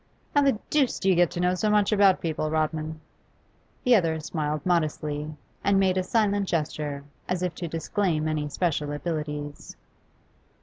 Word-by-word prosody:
'How 285 - +5
the 275 -5 +3
deuce 285 -4 +2
do 195 - +1
you - - +6
get 175 -1 +4
to - - -5
know 180 +1 +2
so 210 +4 0
much 210 0 +3
about 200 -3 +5
people, 155 -2 -1
Rodman?' 155 0 -1 0.8
The 250 -2 +6
other 165 -5 +2
smiled 150 -1 -3
modestly, 155 -3 0 0.3
and 200 -1 +3
made 190 -1 +3
a 185 - +2
silent 205 0 +1
gesture, 150 -3 -2 0.3
as 180 0 -1
if 180 -2 -1
to 170 +1 -5
disclaim 165 0 -1
any 150 -1 -1
special 150 -2 -1
abilities. 150 -2 -4
165 Hz, 165 wpm, -26 LUFS, 155-195 Hz, 0.8 s, you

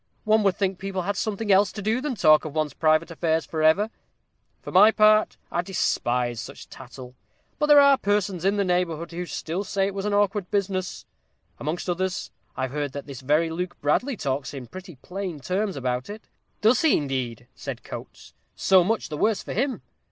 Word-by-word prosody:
One 215 0 +3
would 195 -3 +2
think 195 -3 -1
people 195 -1 -3
had 200 +3 -2
something 210 +1 -2
else 195 0 +4
to - - -7
do 220 +5 0
than 285 -3 -2
talk 155 -6 +5
of 155 -1 -7
one's 155 -3 -1
private 155 +2 +2
affairs 160 -2 0
for 160 +2 -4
ever. 190 +8 +3 0.7
For - - -7
my 200 +4 +7
part, 215 0 +4
I 175 - 0
despise 125 - -1
such 140 - -10
tattle. 125 -1 -11 0.5
But 300 - +2
there 295 -1 +8
are 280 -1 +6
persons 200 -3 0
in 195 +2 +2
the 200 - +2
neighborhood 175 -2 -1
who 175 +1 -5
still 165 +6 -4
say 195 -1 0
it 200 - -3
was 195 0 -4
an 210 - 0
awkward 205 -2 +1
business. 190 -2 -2 0.5
Amongst 155 +6 -3
others, 185 +1 -2 0.3
I've 130 -1 -2
heard 145 -1 -3
that 140 0 -6
this 140 -3 -9
very 155 +5 +1
Luke 180 +2 -4
Bradley 235 - 0
talks 135 -2 -3
in 130 -2 -7
pretty 180 +6 -10
plain 185 -4 -5
terms 190 +6 -2
about 125 +1 -2
it." 215 +1 -8 0.4
"Does 225 +3 +4
he, 320 - +4
indeed?" 130 -5 -3
said - - -7
Coates. - - -10 0.2
"So 190 -2 +4
much 225 +5 -1
the 150 - -5
worse 215 +5 +1
for - - -6
him. 260 +3 -1
180 Hz, 195 wpm, -25 LUFS, 150-205 Hz, 0.7 s, there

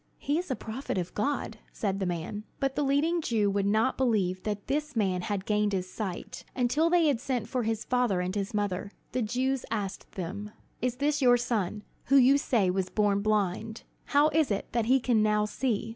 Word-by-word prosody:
"He 295 +3 0
is 360 - -5
a 260 - 0
prophet 225 0 -5
of 180 -1 -3
God," 220 -1 -2
said 195 -2 -2
the 190 - -1
man. 180 +4 -4 0.2
But 270 -1 0
the - - 0
leading 295 +5 +2
Jews 210 -7 +1
would 200 0 +1
not 220 +6 +2
believe 200 -8 +1
that 205 -1 -3
this 295 0 -2
man 190 -5 +1
had 200 +1 -3
gained 210 -1 +1
his 185 -1 -1
sight, 180 -3 -5
until 275 +6 +2
they 345 -1 +4
had 285 -6 +2
sent 250 -4 -2
for 255 - -1
his 225 -1 -2
father 245 -7 +1
and 180 +1 -2
his 200 -1 -2
mother. 205 -2 -2 0.2
The 255 - -1
Jews 255 +4 0
asked 205 -3 -4
them: 200 +4 -5 0.3
"Is 250 0 0
this 290 +2 0
your 245 -2 +6
son, 215 -4 -2 0.2
who 275 - +3
you 275 +1 +6
say 210 -9 +2
was 185 0 -1
born 205 -2 +2
blind? 215 +1 -1 0.2
How 290 +2 +4
is 315 -2 +2
it 200 -2 -2
that 230 -2 0
he 265 +2 +5
can 240 -3 +2
now 210 0 +2
see?" 225 0 -1
220 Hz, 205 wpm, -29 LUFS, 200-260 Hz, 0.3 s, your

